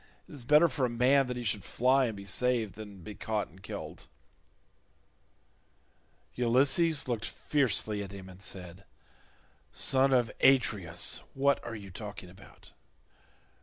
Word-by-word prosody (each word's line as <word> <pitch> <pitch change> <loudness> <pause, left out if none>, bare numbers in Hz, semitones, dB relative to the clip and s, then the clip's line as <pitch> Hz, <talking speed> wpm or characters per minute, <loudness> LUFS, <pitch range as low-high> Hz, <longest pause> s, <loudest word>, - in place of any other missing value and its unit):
It - - -14
is 135 -5 -9
better 150 +5 +6
for 135 -2 -3
a - - -5
man 130 +3 +3
that 125 0 -4
he 120 - -4
should 105 -3 -1
fly 130 +2 +2
and 110 -3 -5
be 100 - -9
saved 115 0 0
than 100 -3 -10
be 105 - -8
caught 105 0 -3
and 95 +3 -18
killed." - - -8 2.3
Ulysses 135 +7 +2
looked 115 -3 -2
fiercely 110 -7 0
at 100 -1 -7
him 95 -2 -9
and 95 0 -13
said, 90 0 -5 0.9
"Son 135 0 +2
of 125 -2 +2
Atreus, 105 -11 +2 0.2
what 140 +1 +2
are 115 - -6
you 100 -3 -9
talking 100 -2 -8
about? 95 +1 -17
115 Hz, 145 wpm, -30 LUFS, 100-130 Hz, 2.3 s, better